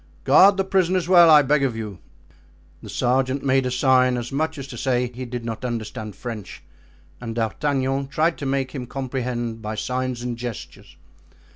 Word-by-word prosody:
Guard 195 - +6
the 195 - +2
prisoners 185 -2 +1
well, 175 -2 +7
I 150 -2 +8
beg 145 +1 +2
of 130 -5 0
you." 105 -5 -6 0.8
The - - -10
sergeant 130 +2 0
made 135 -1 +2
a - - -1
sign, 130 0 +3
as 120 +1 -5
much 160 +3 -2
as 135 - -6
to 125 - -8
say 125 0 0
he 130 +1 -6
did 120 -1 -6
not 115 0 -5
understand 110 -3 -5
French, 115 -5 -8 0.6
and 115 -2 -6
D'Artagnan 135 +3 -1
tried 155 +4 +1
to 140 - -3
make 135 -1 -1
him 125 -4 -6
comprehend 125 -3 -4
by 110 0 -4
signs 125 +1 -3
and 120 -1 -4
gestures. 120 -3 -8
130 Hz, 175 wpm, -23 LUFS, 120-140 Hz, 0.8 s, I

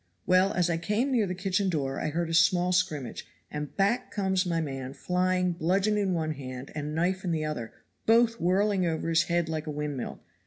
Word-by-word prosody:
Well, 185 +2 +4
as 180 -1 +2
I 170 -1 0
came 210 +10 0
near 230 -6 +2
the 180 - -3
kitchen 190 +1 0
door 135 -5 -1
I - - -1
heard 165 +2 -2
a - - -2
small 175 +2 +4
scrimmage, 180 -8 -1 0.2
and 150 -1 -5
back 205 +6 +1
comes 190 -2 0
my 165 -1 0
man 135 -4 -4
flying 180 +2 +1
bludgeon 190 +5 +1
in 195 -3 +1
one 160 -1 -1
hand 130 -2 -7
and 150 0 -4
knife 185 +3 0
in 180 - -2
the 160 -2 0
other, 120 -7 -4 0.4
both 230 0 +4
whirling 195 +2 +2
over 165 -1 -1
his 165 +1 +3
head 170 -1 0
like 160 -1 -3
a - - -2
windmill. 145 -3 -4
175 Hz, 205 wpm, -28 LUFS, 155-190 Hz, 0.4 s, Well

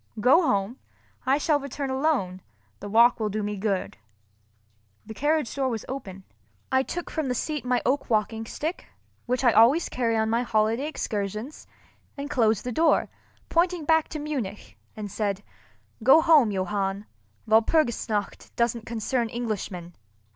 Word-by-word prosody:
Go 255 - +5
home, 215 - 0 0.5
I 270 +2 +4
shall 300 0 +1
return 280 0 -4
alone, 260 -10 0 0.4
the 205 - -7
walk 235 +3 +5
will 215 -1 -1
do 210 +1 -3
me 205 0 -3
good." 195 -1 -2 1.1
The 220 - -8
carriage 295 +2 0
door 270 -2 0
was 225 -3 -4
open. 195 -8 -7 0.5
I 260 - +4
took 345 +6 -5
from 315 -3 -2
the 250 - -1
seat 300 +4 -3
my 250 -1 0
oak 275 +3 0
walking 220 0 0
stick—which 270 -5 -5
I 240 - +6
always 240 +10 +5
carry 230 -3 0
on 220 0 +1
my 230 +2 +1
holiday 225 +3 +1
excursions—and 240 +4 -6
closed 220 -6 +2
the 250 - -3
door, 320 +6 +2 0.4
pointing 345 -1 +1
back 320 0 +3
to 310 - -6
Munich, 265 -10 -5 0.2
and 205 -2 -6
said, 205 -1 -2 0.6
"Go 265 +7 +7
home, 315 -8 +5
Johann—Walpurgis 200 - -1
nacht 205 -2 -3
doesn't 235 -1 -1
concern 235 +1 -1
Englishmen." 205 -7 -4
235 Hz, 145 wpm, -26 LUFS, 210-280 Hz, 1.1 s, Go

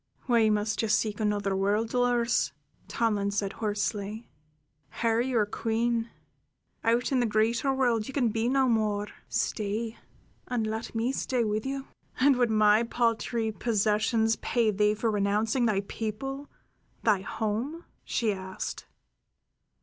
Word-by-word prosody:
"Why 230 -4 +4
must 210 0 0
you 225 - 0
seek 215 0 +1
another 205 -2 0
world, 205 +4 +1
Dolores?" 245 -1 +1 0.3
Tomlin 210 -3 0
said 200 -1 -2
hoarsely. 210 +1 -3 0.7
"Here 230 0 +3
you 250 -1 0
are 215 - +3
queen. 230 +2 -1 0.7
Out 235 +3 +2
in 265 - +3
the 240 - +2
greater 225 +5 +1
world 245 -5 +1
you 270 - -7
can 250 -5 +2
be 225 +2 0
no 265 0 +3
more. 210 -3 +1 0.2
Stay, 220 +2 -2 0.5
and 240 -3 -1
let 220 +2 -4
me 230 +3 +1
stay 255 -2 0
with 215 +2 -1
you." 270 0 -3 0.3
"And 275 +1 +5
would 245 -2 +3
my 215 0 +5
paltry 230 -1 0
possessions 220 +1 +1
pay 230 -3 +1
thee 210 +1 +2
for 225 +1 0
renouncing 210 +4 +1
thy 200 -3 +1
people, 250 +7 -5 0.5
thy 215 -4 +4
home?" 225 - -3 0.2
she 220 -3 0
asked. 190 -1 -6
225 Hz, 140 wpm, -28 LUFS, 210-240 Hz, 0.7 s, And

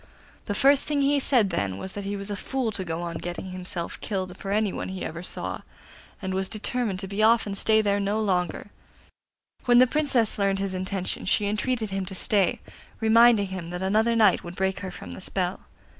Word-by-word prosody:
The 205 - -1
first 275 +4 +4
thing 290 -2 +1
he 285 +1 +3
said 240 -8 +3
then 100 - -1
was 190 - -6
that 200 -1 -5
he 200 +1 -2
was 200 +1 -5
a - - -1
fool 255 +2 -2
to 205 -2 -3
go 165 -1 -4
on 170 -1 -4
getting 175 +2 -5
himself 180 -2 -6
killed 185 -3 -3
for 195 - -7
anyone 205 -1 0
he 190 -1 -5
ever 165 +2 -5
saw, 180 - -4 0.6
and 190 0 -2
was 190 0 -1
determined 215 -1 -2
to 195 - -5
be 200 +2 -2
off 225 +1 +5
and 200 -1 -4
stay 220 +2 +3
there 200 -1 +2
no 200 +2 0
longer, 190 -1 -1 0.9
When 245 -1 +5
the 255 - +8
Princess 255 -6 +1
learned 195 -1 +2
his 195 -1 -2
intention 185 0 -3
she 205 +2 +2
entreated 215 +1 -1
him 195 -1 -2
to 190 - -6
stay, 195 -1 +1 0.4
reminding 225 -2 +5
him 185 -3 -6
that 180 +1 -4
another 220 +4 +2
night 215 -5 +4
would 175 +1 -9
free 190 0 +1
her 190 - -5
from 90 - -9
the 85 - -8
spell. - - -3
200 Hz, 210 wpm, -26 LUFS, 185-220 Hz, 0.9 s, the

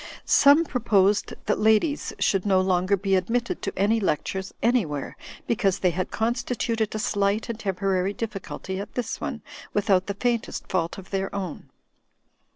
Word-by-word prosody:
Some 290 +4 +6
proposed 210 -7 +2
that 210 - +1
ladies 220 +8 +2
should 195 -2 +1
no 195 -2 +3
longer 185 +1 +2
be 195 0 +1
admitted 230 +6 -1
to - - -4
any 210 +4 +3
lectures 190 0 -2
anjrwhere, 195 - +1 0.3
because 200 -5 +1
they 180 - +2
had 185 +2 -2
constituted 230 -1 -1
a - - 0
slight 210 -1 0
and 230 -1 -4
temporary 195 -1 0
difficulty 195 -3 -5
at 200 - -7
this 245 -3 -3
one, - - -4 0.3
without 195 -2 +2
the 200 - -3
faintest 235 +1 -2
fault 170 -3 -1
of 190 -1 -11
their 195 0 -2
own. 190 -5 -5
200 Hz, 155 wpm, -25 LUFS, 190-225 Hz, 0.3 s, Some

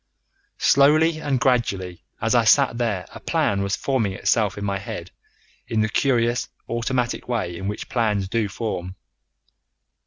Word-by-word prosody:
Slowly 155 +4 +4
and 145 -4 0
gradually 100 -9 0 0.2
as - - 0
I - - +4
sat 120 - +4
there 105 -7 -1
a - - -9
plan 100 -1 0
was 100 0 0
forming 120 -8 -1
itself 105 0 +1
in 100 - -4
my 100 -1 -1
head 95 - -7 0.6
in 110 -1 0
the 110 - +1
curious 120 -1 +1 0.2
automatic 120 +1 -2
way 110 -8 -2
in 95 +3 -5
which 105 - -4
plans 105 -5 0
do 110 +2 0
form. 95 -3 -4
115 Hz, 150 wpm, -23 LUFS, 100-125 Hz, 0.6 s, Slowly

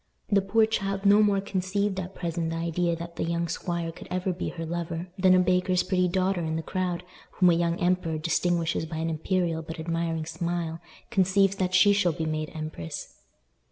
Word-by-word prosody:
The 200 -1 +5
poor 220 +3 +3
child 195 -2 -2
no 205 +1 +7
more 205 -2 +3
conceived 195 0 -1
at 185 0 -6
present 170 -2 -2
the 165 - -3
idea 170 +1 0
that 170 0 -8
the - - -1
young 170 0 -1
squire 170 0 -3
could - - -12
ever 185 0 -1
be 175 - -3
her 165 -1 -5
lover 170 +1 -4
than 185 -1 +5
a - - +5
baker's 180 0 +2
pretty 180 -1 +1
daughter 185 0 +1
in 160 -1 -2
the 160 - -2
crowd, 180 -1 -2 0.3
whom 180 -2 +5
a - - +4
young 170 +1 +1
emperor 175 -3 +1
distinguishes 165 0 0
by 160 0 -5
an 165 +1 -1
imperial 165 0 0
but 160 +1 -8
admiring 165 -1 -2
smile, 165 0 -3 0.3
conceives 195 -1 +3
that 185 -1 0
she 205 +3 +6
shall 180 -4 +2
be 165 -1 -3
made 155 0 -2
empress. 155 - -6
175 Hz, 195 wpm, -27 LUFS, 165-185 Hz, 0.3 s, no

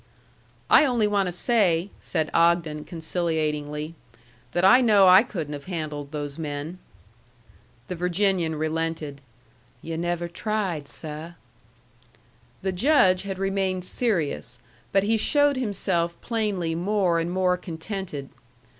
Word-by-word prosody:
"I - - +7
only 245 -6 +2
want 205 -2 +1
to - - -2
say," 185 -2 +1
said 155 -1 -2
Ogden, 165 -3 +2
conciliatingly, 155 -2 -2 0.6
"that 175 +5 +1
I 250 +6 +7
know 210 -5 +6
I 185 +2 +9
couldn't 165 - -5
have 145 -1 -7
handled 155 -5 -5
those 145 -1 -5
men." 150 +3 -5 1.1
The - - -4
Virginian 180 -1 +1
relented. 155 -2 -3 0.6
"Yu' 165 0 -4
never 175 0 -2
tried, 180 -4 -2
seh." 155 +3 -7 1.3
The 190 - 0
Judge 185 -3 +4
had 195 -1 -5
remained 190 -1 -1
serious; 170 - 0 0.3
but 195 0 +3
he 220 +2 +2
showed 290 +4 +3
himself 175 -7 -1
plainly 205 -8 -1
more 180 0 +1
and 165 +1 -2
more 180 0 +2
contented. 170 -4 -6
175 Hz, 120 wpm, -25 LUFS, 160-195 Hz, 1.3 s, I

